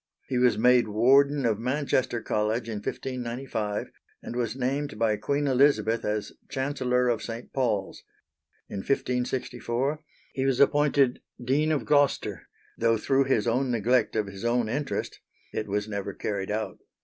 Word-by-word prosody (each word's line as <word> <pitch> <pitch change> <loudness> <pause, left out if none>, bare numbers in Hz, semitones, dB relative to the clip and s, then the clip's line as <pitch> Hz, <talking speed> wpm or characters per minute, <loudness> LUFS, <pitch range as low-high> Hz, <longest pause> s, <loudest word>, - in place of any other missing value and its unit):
He 125 - 0
was 125 -1 +4
made 125 +1 +5
Warden 135 +6 +4
of 110 -3 +1
Manchester 130 -2 0
College 110 +3 -1
in 110 -2 -3
1595, 120 -2 -4 0.3
and - - -6
was 120 -2 -1
named 135 0 -2
by 110 -1 +2
Queen 140 +6 -1
Elizabeth 130 -4 +3
as 105 0 -2 0.2
Chancellor 130 -2 0
of 115 -3 +1
St. 115 +1 -7
Paul's. 110 -7 -1 0.7
In - - -6
1564, 125 +3 -1 0.3
he 135 - -1
was 130 -2 +1
appointed 140 -3 +3 0.2
Dean 140 +6 +1
of 150 - 0
Gloucester, 145 -2 +1 0.3
though 115 0 +2
through 135 +5 +2
his 125 -6 +1
own 125 +3 +1
neglect 120 +1 +2
of 110 -1 +1
his 100 0 -9
own 120 -1 +1
interest 145 +5 -3 0.3
it 105 - -3
was 105 +1 -1
never 100 -2 -4
carried 100 -2 -3
out. 105 -2 -3
125 Hz, 150 wpm, -27 LUFS, 110-135 Hz, 0.7 s, made